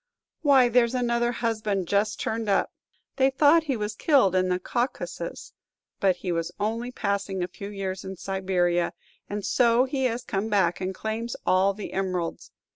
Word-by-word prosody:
"Why, 275 Hz, -5 st, +5 dB
there's 240 Hz, 0 st, +3 dB
another 240 Hz, -1 st, +1 dB
husband 215 Hz, -6 st, -1 dB
just 205 Hz, +2 st, +1 dB
turned 220 Hz, -1 st, -2 dB
up. 195 Hz, -, +2 dB, 0.5 s
They 265 Hz, 0 st, +4 dB
thought 300 Hz, +4 st, +4 dB
he 270 Hz, -5 st, -1 dB
was 210 Hz, 0 st, -3 dB
killed 255 Hz, -, +3 dB
in 185 Hz, 0 st, +2 dB
the 180 Hz, -, +2 dB
Caucasus, 185 Hz, -5 st, -4 dB, 0.5 s
but 190 Hz, -2 st, +3 dB
he 180 Hz, 0 st, -4 dB
was 165 Hz, -1 st, -2 dB
only 230 Hz, +4 st, -2 dB
passing 200 Hz, -4 st, -2 dB
a -, -, -2 dB
few 200 Hz, +3 st, -8 dB
years 190 Hz, -2 st, -4 dB
in 190 Hz, 0 st, -6 dB
Siberia; 180 Hz, -2 st, 0 dB, 0.4 s
and 205 Hz, 0 st, -4 dB
so 240 Hz, 0 st, +4 dB
he 265 Hz, 0 st, -1 dB
has 240 Hz, 0 st, -1 dB
come 200 Hz, +2 st, -2 dB
back, 190 Hz, -5 st, +2 dB
and 185 Hz, 0 st, -3 dB
claims 225 Hz, +3 st, -3 dB
all 190 Hz, +2 st, +3 dB
the 210 Hz, -, -7 dB
emeralds. 185 Hz, -3 st, -2 dB
205 Hz, 170 wpm, -26 LUFS, 190-240 Hz, 0.5 s, Why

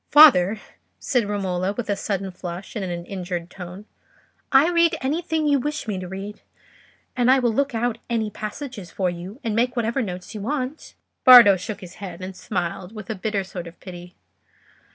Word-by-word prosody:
"Father," 220 Hz, -, +7 dB, 0.4 s
said 240 Hz, -6 st, 0 dB
Romola, 190 Hz, -2 st, -1 dB
with 240 Hz, +2 st, -4 dB
a 205 Hz, -, +1 dB
sudden 195 Hz, -1 st, -3 dB
flush 180 Hz, +2 st, -7 dB
and 210 Hz, -, -2 dB
in 185 Hz, -, -3 dB
an 170 Hz, 0 st, -5 dB
injured 180 Hz, -2 st, -5 dB
tone, 180 Hz, +2 st, -9 dB, 0.7 s
"I 275 Hz, +4 st, +6 dB
read 340 Hz, -1 st, +3 dB
anything 315 Hz, +3 st, -1 dB
you 285 Hz, -1 st, +3 dB
wish 295 Hz, 0 st, -3 dB
me 200 Hz, -3 st, -2 dB
to 185 Hz, -, -6 dB
read; 195 Hz, +3 st, -7 dB, 0.7 s
and 245 Hz, -1 st, +2 dB
I 265 Hz, -, +7 dB
will 240 Hz, -3 st, +1 dB
look 280 Hz, +1 st, 0 dB
out 235 Hz, 0 st, -1 dB
any 220 Hz, -2 st, -1 dB
passages 215 Hz, -, -6 dB
for 185 Hz, -2 st, -1 dB
you, 180 Hz, +7 st, -8 dB
and 225 Hz, -2 st, -1 dB
make 245 Hz, +2 st, +1 dB
whatever 235 Hz, +2 st, 0 dB
notes 180 Hz, -3 st, -6 dB
you 210 Hz, -, -6 dB
want." 265 Hz, +5 st, -4 dB, 0.3 s
Bardo 240 Hz, -6 st, +10 dB
shook 200 Hz, +3 st, -6 dB
his 180 Hz, -2 st, -11 dB
head, 180 Hz, -3 st, -7 dB
and 190 Hz, 0 st, -6 dB
smiled 185 Hz, +1 st, -4 dB
with 215 Hz, +1 st, -6 dB
a -, -, -3 dB
bitter 205 Hz, 0 st, -2 dB
sort 180 Hz, -2 st, -7 dB
of 170 Hz, -, -13 dB
pity. 180 Hz, -1 st, -10 dB
210 Hz, 190 wpm, -23 LUFS, 185-245 Hz, 0.7 s, Bardo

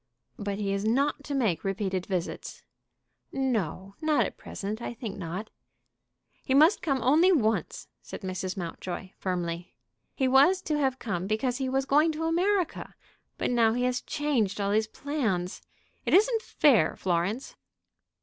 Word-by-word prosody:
"But 200 Hz, -1 st, -3 dB
he 200 Hz, -1 st, -1 dB
is 200 Hz, 0 st, -1 dB
not 275 Hz, +6 st, +1 dB
to 285 Hz, -, -3 dB
make 220 Hz, -11 st, +1 dB
repeated 195 Hz, -2 st, -2 dB
visits." 180 Hz, -3 st, -4 dB, 0.7 s
"No, 210 Hz, -, -2 dB
not 310 Hz, -1 st, +3 dB
at -, -, -6 dB
present; 210 Hz, +3 st, -6 dB
I 235 Hz, -, -5 dB
think 225 Hz, -4 st, -6 dB
not." 185 Hz, +5 st, -5 dB, 0.9 s
"He 265 Hz, -, +1 dB
must 310 Hz, +7 st, +6 dB
come 275 Hz, -6 st, 0 dB
only 315 Hz, +9 st, +5 dB
once," 225 Hz, -10 st, 0 dB
said -, -, -8 dB
Mrs. 185 Hz, 0 st, -4 dB
Mountjoy, 180 Hz, +1 st, -5 dB
firmly. 175 Hz, -2 st, -3 dB, 0.4 s
"He 265 Hz, -, +1 dB
was 280 Hz, +9 st, +5 dB
to 305 Hz, -2 st, -1 dB
have 265 Hz, -2 st, +1 dB
come 190 Hz, -7 st, -3 dB
because 240 Hz, +4 st, 0 dB
he 265 Hz, -1 st, -2 dB
was 265 Hz, +1 st, 0 dB
going 300 Hz, +4 st, +4 dB
to 315 Hz, +1 st, -4 dB
America. 360 Hz, +2 st, 0 dB, 0.4 s
But -, -, -1 dB
now 230 Hz, -2 st, +4 dB
he 245 Hz, +1 st, 0 dB
has 250 Hz, 0 st, 0 dB
changed 260 Hz, -10 st, -1 dB
all 200 Hz, 0 st, 0 dB
his 215 Hz, +1 st, +2 dB
plans. 220 Hz, -10 st, -2 dB, 0.4 s
It -, -, +3 dB
isn't 450 Hz, +3 st, +4 dB
fair, 260 Hz, -, +3 dB
Florence." 185 Hz, +7 st, -1 dB
230 Hz, 155 wpm, -28 LUFS, 195-285 Hz, 0.9 s, must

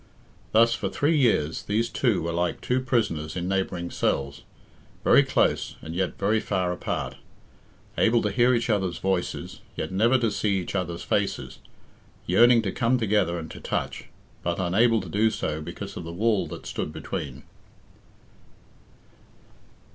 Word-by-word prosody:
Thus 115 Hz, +1 st, +5 dB
for -, -, -2 dB
three 150 Hz, +3 st, +1 dB
years 110 Hz, -, +2 dB
these 110 Hz, +3 st, 0 dB
two 120 Hz, -6 st, +1 dB
were 85 Hz, -, -2 dB
like 85 Hz, +1 st, -1 dB
two 125 Hz, +1 st, 0 dB
prisoners 100 Hz, -12 st, -1 dB
in 90 Hz, 0 st, -2 dB
neighbouring 95 Hz, -2 st, -2 dB
cells, 70 Hz, +1 st, -1 dB, 0.6 s
very -, -, +6 dB
close -, -, +1 dB
and 80 Hz, -, -8 dB
yet 90 Hz, +1 st, -2 dB
very 105 Hz, +3 st, +2 dB
far 90 Hz, -4 st, -1 dB
apart, 80 Hz, -, -3 dB, 0.8 s
able 115 Hz, 0 st, +4 dB
to 105 Hz, -, 0 dB
hear 120 Hz, +5 st, +4 dB
each 120 Hz, -, 0 dB
other's 95 Hz, -6 st, 0 dB
voices, 95 Hz, -2 st, -2 dB, 0.2 s
yet 80 Hz, -, -4 dB
never 115 Hz, +7 st, +3 dB
to 115 Hz, -3 st, +1 dB
see 100 Hz, -1 st, 0 dB
each 90 Hz, -, -4 dB
other's 85 Hz, -3 st, -2 dB
faces, -, -, -1 dB, 0.7 s
yearning 115 Hz, +5 st, +5 dB
to 95 Hz, -, -1 dB
come 125 Hz, +1 st, +1 dB
together 105 Hz, -6 st, +1 dB
and 80 Hz, -2 st, -7 dB
to -, -, -9 dB
touch, -, -, -3 dB, 0.4 s
but 85 Hz, +1 st, -2 dB
unable 110 Hz, +5 st, +3 dB
to 95 Hz, -, -8 dB
do 105 Hz, +6 st, +2 dB
so 80 Hz, -7 st, -3 dB
because 95 Hz, +5 st, -7 dB
of -, -, -6 dB
the 85 Hz, -, -6 dB
wall 105 Hz, +3 st, +1 dB
that -, -, -9 dB
stood -, -, -4 dB
between. -, -, -6 dB
100 Hz, 155 wpm, -26 LUFS, 85-115 Hz, 0.8 s, very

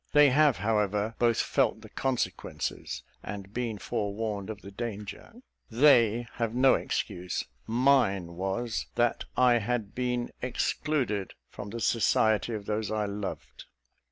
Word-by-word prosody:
They 145 Hz, -2 st, +7 dB
have, 145 Hz, -2 st, +4 dB
however, 105 Hz, +1 st, 0 dB
both 115 Hz, -1 st, +3 dB
felt 120 Hz, -5 st, +1 dB
the 110 Hz, -, -12 dB
consequences, 130 Hz, +1 st, -3 dB, 0.2 s
and 100 Hz, -1 st, -7 dB
been 115 Hz, -3 st, -2 dB
forewarned 105 Hz, -1 st, -3 dB
of 105 Hz, -1 st, -7 dB
the 100 Hz, -, -9 dB
danger. 105 Hz, -, -6 dB, 0.4 s
They 120 Hz, -2 st, +5 dB
have 115 Hz, -1 st, -1 dB
no 130 Hz, +1 st, +6 dB
excuse: 90 Hz, +1 st, -2 dB, 0.2 s
mine 115 Hz, -8 st, +2 dB
was, 95 Hz, +6 st, -2 dB
that 120 Hz, 0 st, +1 dB
I 125 Hz, -2 st, +5 dB
had 115 Hz, -2 st, -2 dB
been 125 Hz, -1 st, -1 dB
excluded 125 Hz, -4 st, -1 dB, 0.2 s
from 100 Hz, -, -7 dB
the 115 Hz, -, -5 dB
society 110 Hz, 0 st, +2 dB
of 105 Hz, -2 st, -6 dB
those 105 Hz, -1 st, -2 dB
I 110 Hz, -1 st, 0 dB
loved. 100 Hz, 0 st, -6 dB
110 Hz, 130 wpm, -29 LUFS, 105-125 Hz, 0.4 s, They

